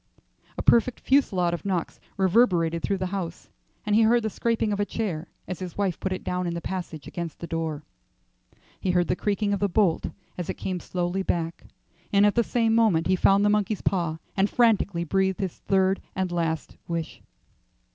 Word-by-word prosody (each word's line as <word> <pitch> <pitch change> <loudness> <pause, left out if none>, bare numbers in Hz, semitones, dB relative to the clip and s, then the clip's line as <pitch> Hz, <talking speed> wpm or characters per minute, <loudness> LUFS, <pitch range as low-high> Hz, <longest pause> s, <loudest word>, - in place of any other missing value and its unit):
A - - -3
perfect 235 +1 +4
fusillade 190 -11 +2
of 175 - -4
knocks 185 -4 -2 0.2
reverberated 180 -5 +3
through 195 - 0
the 185 - -2
house, 180 -4 -5 0.4
and 210 -1 +2
he 225 - +6
heard 230 +1 +4
the 220 - -1
scraping 225 -1 0
of 200 - -3
a - - +3
chair 190 -6 -3 0.2
as 185 - -5
his 180 -3 -7
wife 195 -4 0
put 190 - -2
it 185 - -3
down 180 0 -2
in 170 - -2
the - - -2
passage 170 -4 -5
against 170 -3 -5
the - - -6
door. 160 -3 -3 1.0
He 190 - -2
heard 175 -1 +2
the - - +2
creaking 205 +1 0
of 200 - 0
the 200 - +1
bolt 185 -3 +2 0.3
as 175 - -4
it - - -2
came 185 -2 -3
slowly 180 +2 -2
back, 170 -3 -2 0.4
and 200 0 +5
at 205 - +4
the 235 - +3
same 230 -1 +1
moment 215 -8 +3
he 185 - +3
found 195 +2 +4
the - - +4
monkey's 210 -1 0
paw, 170 -5 0 0.2
and 195 +1 +2
frantically 210 -7 +2
breathed 190 +2 +1
his 190 -3 -3
third 190 0 +2
and 190 -1 -1
last 165 -3 -2
wish. 170 -2 -4
190 Hz, 195 wpm, -26 LUFS, 170-205 Hz, 1.0 s, he